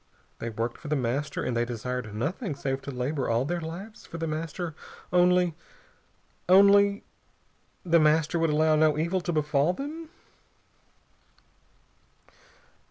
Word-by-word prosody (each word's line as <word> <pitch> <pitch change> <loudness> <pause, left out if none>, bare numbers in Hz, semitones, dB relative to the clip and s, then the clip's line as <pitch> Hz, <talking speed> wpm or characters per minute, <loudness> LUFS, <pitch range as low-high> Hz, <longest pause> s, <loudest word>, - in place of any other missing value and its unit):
They 115 - -4
worked 115 +2 -4
for 155 - -10
The 150 - 0
Master, 135 +3 -2
and 120 - -2
they 120 - +2
desired 120 -1 -4
nothing 150 - -3
save 135 -1 -3
to 135 - -8
labor 130 +2 -2
all 115 +3 +1
their 175 +3 -2
lives 180 +7 -8
for 170 - -9
The 165 - -3
Master, 165 +2 -4 0.4
only 180 -1 +4 1.0
only 200 +1 +6 0.8
The 170 -1 +4
Master 155 +2 +3
would 165 -1 +2
allow 155 +1 +3
no 155 -1 +3
evil 170 +4 0
to 175 - -2
befall 150 +1 +1
them? 310 - -7
155 Hz, 135 wpm, -27 LUFS, 135-175 Hz, 1.0 s, only